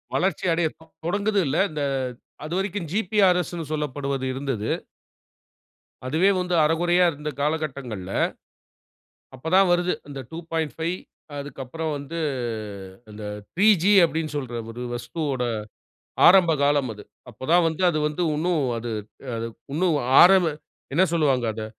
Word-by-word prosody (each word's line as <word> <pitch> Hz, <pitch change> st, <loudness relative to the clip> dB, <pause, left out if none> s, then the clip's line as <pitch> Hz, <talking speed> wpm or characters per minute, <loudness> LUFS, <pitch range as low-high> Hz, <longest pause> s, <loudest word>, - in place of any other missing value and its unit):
வளர்ச்சி 190 Hz, +1 st, 0 dB
அடையட்டும். 160 Hz, -1 st, -3 dB
தொடங்குது 205 Hz, +4 st, +1 dB
இல்ல. 140 Hz, +4 st, 0 dB
இந்த 150 Hz, -1 st, -4 dB, 0.6 s
அதுவரைக்கும் 185 Hz, +2 st, -2 dB
ஜிபிஆர்எஸ்ன்னு 180 Hz, -4 st, +2 dB
சொல்லப்படுவது 140 Hz, -3 st, -2 dB
இருந்தது. 130 Hz, -5 st, -3 dB, 1.4 s
அதுவே 160 Hz, +9 st, +3 dB
வந்து 180 Hz, 0 st, -2 dB
அரகுறையா 175 Hz, +3 st, +3 dB
இருந்த 150 Hz, 0 st, -5 dB
காலகட்டங்கள்ல. 140 Hz, -, -3 dB, 1.2 s
அப்ப 130 Hz, +5 st, -7 dB
தான் 190 Hz, 0 st, +6 dB
வருது. 175 Hz, +1 st, +2 dB, 0.2 s
அந்த 140 Hz, -1 st, -6 dB
2.5 160 Hz, 0 st, -3 dB, 0.5 s
அதுக்கு 140 Hz, 0 st, -8 dB
அப்பறம் 160 Hz, +5 st, -4 dB
வந்து 145 Hz, +4 st, -6 dB, 0.9 s
அந்த 105 Hz, 0 st, -9 dB, 0.3 s
3 195 Hz, +4 st, +2 dB, 0.2 s
ஜீ 195 Hz, -, +4 dB
அப்டின்னு 160 Hz, -2 st, -2 dB
சொல்ற 130 Hz, -4 st, -4 dB, 0.2 s
ஒரு 120 Hz, +2 st, -7 dB
வஸ்துவோட 135 Hz, +1 st, -3 dB, 0.8 s
ஆரம்ப 180 Hz, -2 st, +7 dB
காலம் 140 Hz, -4 st, +2 dB
அது. 105 Hz, -1 st, -12 dB, 0.3 s
அப்ப 125 Hz, +2 st, -9 dB
தான் 175 Hz, 0 st, +6 dB
வந்து 160 Hz, +2 st, -3 dB
அது 160 Hz, -, 0 dB
வந்து 150 Hz, +4 st, -2 dB
இன்னும் 160 Hz, -2 st, +1 dB
அது 115 Hz, 0 st, -4 dB, 0.4 s
அது 115 Hz, 0 st, -3 dB, 0.3 s
இன்னும் 165 Hz, 0 st, +2 dB, 0.2 s
ஆரம்ப 180 Hz, -2 st, +6 dB, 0.4 s
என்ன 180 Hz, -, +5 dB
சொல்வாங்க 140 Hz, -7 st, +2 dB
அத. 110 Hz, 0 st, -5 dB
160 Hz, 125 wpm, -24 LUFS, 140-175 Hz, 1.4 s, ஆரம்ப